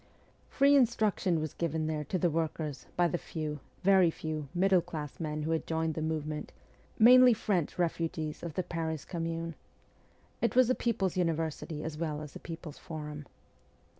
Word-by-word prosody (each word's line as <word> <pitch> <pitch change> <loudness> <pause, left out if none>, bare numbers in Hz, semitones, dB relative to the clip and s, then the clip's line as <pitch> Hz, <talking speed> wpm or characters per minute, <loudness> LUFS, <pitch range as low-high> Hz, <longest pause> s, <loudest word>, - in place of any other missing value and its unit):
Free 280 +1 +5
instruction 215 - +2
was 155 -1 -3
given 160 -1 -1
there 155 -1 -1
to 185 - -1
the 175 -1 +2
workers 155 -2 -3
by 175 0 +4
the 175 0 -2
few, 155 -2 -4 0.2
very 190 -2 +6
few, 155 -2 -4
middle 185 0 +3
class 155 -4 -7
men 155 -2 -3
who 160 - -1
had 160 - -1
joined 160 0 0
the 160 - -4
movement, 155 -1 -3 0.5
mainly 250 +1 +8
French 195 -7 -1
refugees 165 -3 -2
of 165 -3 -6
the 185 - 0
Paris 160 -3 -3
Commune. 165 -1 -3 0.9
It 235 - +1
was 255 -1 +5
a - - +5
people's 210 -8 -1
university 160 -2 -1
as 155 -1 -5
well 155 -2 -2
as 150 - -10
a - - -6
people's 165 -2 -8
forum. 150 -4 -7
165 Hz, 165 wpm, -31 LUFS, 155-180 Hz, 0.9 s, mainly